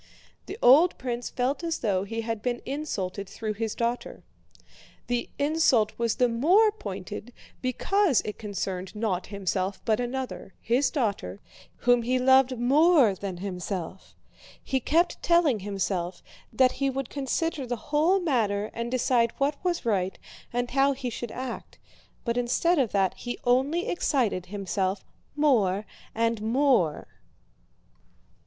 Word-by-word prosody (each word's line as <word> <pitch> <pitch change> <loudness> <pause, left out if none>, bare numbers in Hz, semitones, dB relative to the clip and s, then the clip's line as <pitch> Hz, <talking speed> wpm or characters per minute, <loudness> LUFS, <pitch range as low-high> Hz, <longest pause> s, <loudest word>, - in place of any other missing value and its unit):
The 395 - -6
old 300 +8 +6
prince 245 -1 -4
felt 260 +6 -1
as 330 -1 -1
though 195 -4 0
he 225 +3 -3
had 225 -1 -3
been 240 +1 -2
insulted 200 -9 -4
through 215 -1 -4
his 220 +1 -3
daughter. 235 +1 -3 0.8
The 245 -1 -2
insult 285 -7 +3
was 230 -2 +1
the 250 - +3
more 350 - +4
pointed 205 - -7 0.3
because 305 - +2
it 210 - -6
concerned 195 -2 -4
not 205 -4 -1
himself 195 -1 -2
but 220 0 +2
another, 245 -4 -4
his 255 +4 +1
daughter, 200 - -2 0.4
whom 245 0 +3
he 250 +2 +1
loved 260 0 +4
more 275 - +5
than 190 -1 -6
himself. 185 -1 -5 0.5
He 265 - 0
kept 335 +7 +1
telling 340 -9 +3
himself 190 -3 -3 0.3
that 255 -1 +4
he 275 0 -1
would 270 -1 -4
consider 285 0 -2
the 245 - -1
whole 305 - +2
matter 215 - 0
and 235 +1 -3
decide 245 -2 +2
what 285 +3 -1
was 355 -6 -1
right 190 -4 0 0.3
and 245 0 -2
how 275 +2 +3
he 260 -2 -5
should 235 0 -5
act, 255 -1 -6 0.5
but 235 0 -1
instead 270 +8 +2
of 250 -6 +1
that 195 -2 +2
he 245 0 -5
only 265 +8 +2
excited 235 - 0
himself 195 0 -2 0.3
more 215 -10 +2 0.3
and 230 -1 0
more. 230 - +2
240 Hz, 140 wpm, -27 LUFS, 205-275 Hz, 0.8 s, old